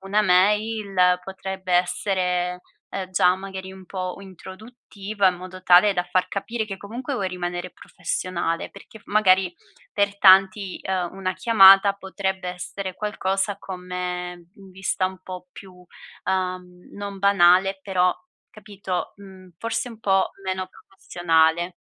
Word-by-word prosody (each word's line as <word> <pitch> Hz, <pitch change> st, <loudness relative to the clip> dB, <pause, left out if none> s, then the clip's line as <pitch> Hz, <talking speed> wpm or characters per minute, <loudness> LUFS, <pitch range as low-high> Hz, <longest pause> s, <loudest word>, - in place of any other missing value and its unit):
una 195 Hz, +2 st, +1 dB
mail 195 Hz, -1 st, +2 dB
potrebbe 190 Hz, -1 st, -6 dB
essere, 180 Hz, 0 st, 0 dB, 0.3 s
uhm, 190 Hz, -1 st, -5 dB
già, 180 Hz, -1 st, +4 dB
magari, 190 Hz, 0 st, -8 dB
un 190 Hz, -1 st, -13 dB
po' 185 Hz, -1 st, -4 dB
introduttiva, 200 Hz, +1 st, -4 dB
in 180 Hz, -, -2 dB
modo 185 Hz, +1 st, -10 dB
tale 185 Hz, +3 st, +6 dB
da 180 Hz, -2 st, 0 dB
far 185 Hz, 0 st, +2 dB
capire 220 Hz, +4 st, -3 dB
che 195 Hz, -2 st, -6 dB
comunque 240 Hz, +8 st, -6 dB
vuoi 195 Hz, -6 st, -1 dB
rimanere 180 Hz, 0 st, -4 dB
professionale, 170 Hz, -2 st, -4 dB
perché 220 Hz, +3 st, -14 dB
f -, -, -25 dB
magari, 190 Hz, -3 st, +3 dB, 0.4 s
per 200 Hz, 0 st, 0 dB
tanti, 190 Hz, 0 st, +5 dB
uhm, 185 Hz, -1 st, -3 dB
una 185 Hz, -1 st, -2 dB
chiamata 195 Hz, -2 st, +7 dB
potrebbe 190 Hz, -1 st, -4 dB
essere 185 Hz, +1 st, -6 dB
qualcosa 195 Hz, -1 st, -2 dB
come 180 Hz, -2 st, -5 dB, 0.2 s
mhmm 195 Hz, -3 st, -16 dB
vista 190 Hz, 0 st, -1 dB
un 185 Hz, 0 st, -8 dB
po' 185 Hz, -1 st, -9 dB
più 190 Hz, -2 st, -12 dB, 0.5 s
uhm, 185 Hz, -1 st, -1 dB, 0.3 s
non 200 Hz, -1 st, -7 dB
banale, 195 Hz, 0 st, +4 dB
però 180 Hz, -2 st, +2 dB, 0.4 s
capito 200 Hz, -3 st, -5 dB
mhmm, 190 Hz, -2 st, -14 dB
forse 230 Hz, +2 st, -3 dB
un 225 Hz, -2 st, -12 dB
po' 195 Hz, -2 st, +2 dB
meno 185 Hz, 0 st, -2 dB
professionale. 175 Hz, -2 st, 0 dB
190 Hz, 135 wpm, -23 LUFS, 180-200 Hz, 0.5 s, chiamata